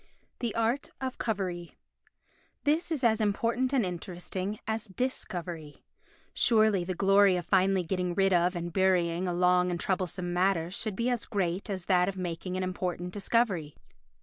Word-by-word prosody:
The 235 -4 -2
Art 230 +4 0
of 260 -1 -4
Covery 185 -6 -3 0.9
This 315 +4 +1
is 295 -5 -1
as 225 -2 +3
important 230 +5 +1
and 260 -7 +2
interesting 185 +3 -4
as 220 0 -2
Dis 250 +6 -2
covery. 170 -6 -7 0.5
Surely 215 -5 +3
the 185 +1 -3
glory 195 0 +5
of 175 -2 -3
finally 190 0 +3
getting 180 0 -2
rid 195 0 +3
of 175 +1 +3
and 175 -1 -4
burying 180 -2 +2
a - - 0
long 180 0 +3
and 175 -1 -2
troublesome 180 -1 -2
matter 175 -2 +1
should 210 +1 -2
be 235 +4 0
as 240 -2 -2
great 190 -2 -2
as 190 -3 -4
that 180 -1 +3
of 195 - -6
making 180 +1 -4
an 185 - -1
important 180 -1 -3
discovery. 200 -8 0
190 Hz, 165 wpm, -29 LUFS, 180-215 Hz, 0.9 s, glory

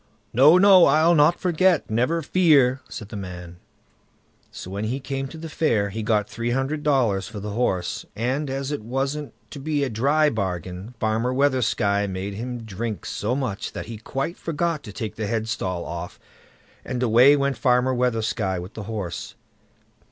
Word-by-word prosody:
"No, 145 +8 +7
no; 190 -2 +7
I'll 160 +2 +4
not 160 +2 +4
forget, 180 -1 +2
never 125 +10 0
fear", 140 -6 +4
said 105 - -8
the - - -8
man. 90 -3 -8 0.9
So 90 - -9
when 100 +2 -3
he 125 +5 -2
came 135 0 -4
to 160 - -10
the 165 +1 -7
fair, 115 -11 0
he 110 +3 -4
got 105 -1 +1
three 115 +2 -4
hundred 135 +5 -1
dollars 120 -10 +1
for 110 -2 -7
the 105 +1 -5
horse, 100 -6 -1
and 130 +6 -1
as 135 +1 -3
it 145 - -3
wasn't 135 +6 -3 0.2
to 145 - -7
be 145 0 -1
a 135 - -1
dry 145 +7 +2
bargain, 95 - -4
Farmer 110 +3 0
Weathersky 120 -7 +1
made 95 +2 -4
him 120 +3 -5
drink 110 +1 -5
so 115 +5 -2
much 125 -7 -3
that - - -5
he 115 0 -7
quite 135 +9 -4
forgot 165 -1 -2
to 105 - -8
take 105 0 -6
the 110 -1 -2
headstall 110 -5 -2
off, 85 +1 -6 0.6
and 125 -1 -3
away 125 +5 +6
went 140 -1 0
Farmer 125 0 +3
Weathersky 115 -5 0
with 90 +5 -8
the 110 - -7
horse. 100 -6 -5
125 Hz, 175 wpm, -23 LUFS, 105-140 Hz, 0.9 s, No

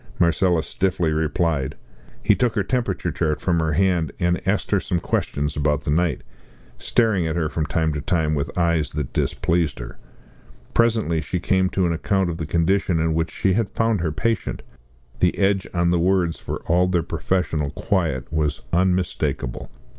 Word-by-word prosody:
Marcella 85 -1 +2
stiffly 90 -3 0
replied. 80 -2 0 0.5
He - - +5
took 125 -3 0
her 100 - +1
temperature 100 -7 -1
chart 75 -1 -1
from 85 -2 +1
her 80 -1 0
hand 90 -4 +1
and 90 0 +1
asked 100 +2 0
her 100 - +4
some 90 -1 -1
questions 75 -2 -1
about 75 -1 0
the - - -1
night, 80 -3 +1 0.6
staring 110 -8 +2
at 80 - -2
her 85 -2 0
from 75 -2 -2
time 80 +1 0
to 75 - -3
time 80 -2 0
with 70 +3 -3
eyes 85 -4 +1
that 75 -4 -4
displeased 85 -2 0
her. - - -9 0.7
Presently 110 -9 +2
she 90 - -3
came 95 0 +2
to 95 -1 0
an 85 - +1
account 95 +2 0
of 80 - -5
the 80 -3 -4
condition 85 +1 +1
in 80 0 +1
which 80 +1 0
she 95 - 0
had 110 0 0
found 115 -4 0
her 80 -2 0
patient. 115 +5 -2 0.6
The - - +2
edge 95 -1 +2
on 85 -1 +1
the 90 - +2
words, 90 -1 +1
for - - -5
all 90 +2 +3
their 90 -2 +1
professional 80 -2 -1
quiet, 80 - -1
was 75 -3 -1
unmistakable. 90 -8 0
85 Hz, 175 wpm, -22 LUFS, 80-95 Hz, 0.7 s, He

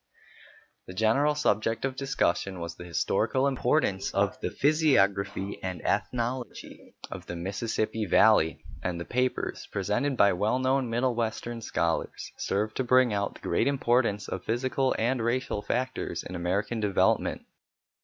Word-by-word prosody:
The 90 - -9
general 115 +9 +3
subject 115 -5 +1
of 135 -1 -2
discussion 100 -9 0
was 85 0 -5
the 90 - -10
historical 130 +9 +1
importance 125 -6 +1
of 100 -1 +2
the - - -1
physiography 100 -10 +2
and 95 -2 -4
ethnology 120 -1 -3 0.2
of - - -7
the 85 - -5
Mississippi 110 +4 -2
Valley, 95 -4 +4 0.2
and 90 -2 -2
the 85 - -5
papers, 125 +1 -1
presented 105 +8 -1
by 100 -1 +5
well 105 +7 +1
known 130 -1 +1
middle 120 +2 +1
western 115 0 -3
scholars, 85 -6 -2
served 105 +2 -1
to 130 - +1
bring 125 -2 +4
out 100 -1 -1
the - - -14
great - - +1
importance 120 -6 +1
of 95 - -5
physical 130 +3 0
and 120 +1 0
racial 120 -2 -1
factors 125 -7 -2
in - - -8
American 95 +6 -1
development. 105 -3 +1
115 Hz, 145 wpm, -28 LUFS, 100-130 Hz, 0.2 s, by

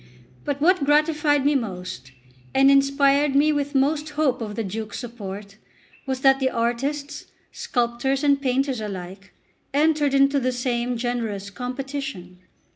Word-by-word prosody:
But 285 -1 -2
what 345 +1 +3
gratified 295 -1 +2
me 290 - +4
most, 180 - -4 0.4
and 270 +1 +6
inspired 275 +1 +3
me 295 +2 +4
with 285 0 -2
most 295 +3 +1
hope 265 -5 +1
of 210 -2 -5
the 225 - -2
Duke's 215 +2 -5
support, 205 -4 -8 0.5
was 260 -1 -2
that 270 0 +5
the 265 -1 +1
artists, 275 +5 -2 0.2
sculptors 245 +3 -1
and 280 -1 +3
painters 265 -2 0
alike, 195 -1 -7 0.4
entered 295 -2 +2
into 275 +1 +4
the 255 -1 0
same 245 -1 -1
generous 225 -5 -3
competition. 250 -6 -6
265 Hz, 135 wpm, -23 LUFS, 230-285 Hz, 0.5 s, and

